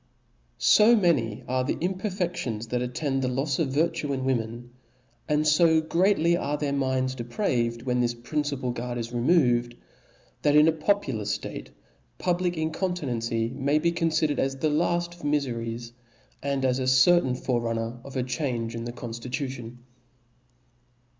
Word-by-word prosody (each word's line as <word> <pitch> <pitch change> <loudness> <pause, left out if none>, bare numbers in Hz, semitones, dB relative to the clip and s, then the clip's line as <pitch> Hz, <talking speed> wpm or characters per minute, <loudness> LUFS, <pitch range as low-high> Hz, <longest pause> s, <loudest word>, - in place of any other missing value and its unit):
O - - +7
O - - +7
many 135 - +1
are 130 0 0
the 130 - -1
imperfedions 175 - -2
that 125 +1 -1
attend 135 +2 -1
the 130 - 0
*^ - - -1
lofs 135 +2 -1
of 160 - +2
virtue 155 +2 0
in 130 -1 -2
women, 120 -1 -2 0.6
and 150 +1 +2
fo 160 +1 +5
greatly 170 +1 +2
are 150 -4 -1
their 145 -2 -1
minds 130 -1 0
depraved, 120 - -1
when 125 -1 0
this 120 -1 +1
principal 140 +1 -2
guard 120 0 -4
is 115 0 -4
re 120 - -1
moved, 120 -5 +3 0.7
that 145 0 +3
in 150 +1 +7
a - - +6
popular 155 - 0
ftate - - -4 0.5
public 175 -1 0
incontinency 130 -9 -1
may 140 +3 0
be 170 +2 +2
confidered 160 -3 0
as 135 0 0
the 150 +3 0
laft 175 +2 0
of 175 - -16
miferies, 120 -5 -2 0.5
and 140 -1 -1
as 130 0 +1
a 130 - -1
certain 130 +1 +5
fore 125 -1 -1
runner 115 +1 -3
of 140 - -10
a 130 - +1
change 125 -3 -2
in 115 0 -5
the 120 - -4
confli 120 0 -7
lution. 130 -3 -4
135 Hz, 160 wpm, -26 LUFS, 120-160 Hz, 0.7 s, O